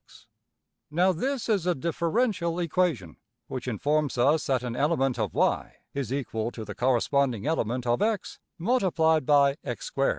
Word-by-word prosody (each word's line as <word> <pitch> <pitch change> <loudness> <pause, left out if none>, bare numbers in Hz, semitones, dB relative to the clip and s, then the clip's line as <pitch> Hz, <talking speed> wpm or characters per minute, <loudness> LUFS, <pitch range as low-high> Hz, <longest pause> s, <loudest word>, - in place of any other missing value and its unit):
\] - - -56
Now 185 +1 +5
this 260 - -2
is 200 -6 +1
a 180 - +2
``differential 170 - 0
equation'' 165 - -1 0.3
which 130 -1 -6
informs 145 +4 0
us 145 +5 +3
that 130 -2 +1
an 120 -1 -4
element 135 -3 +1
of~$y$ 105 -6 0 0.2
is 140 -4 -3
equal 120 -5 -2
to 110 - -7
the 105 - -6
corresponding 125 -1 +1
element 125 -6 -1
of~$x$ 205 - 0 0.2
multiplied 165 - +2
by~$x^2$. 140 -2 +1
145 Hz, 135 wpm, -27 LUFS, 125-170 Hz, 0.3 s, Now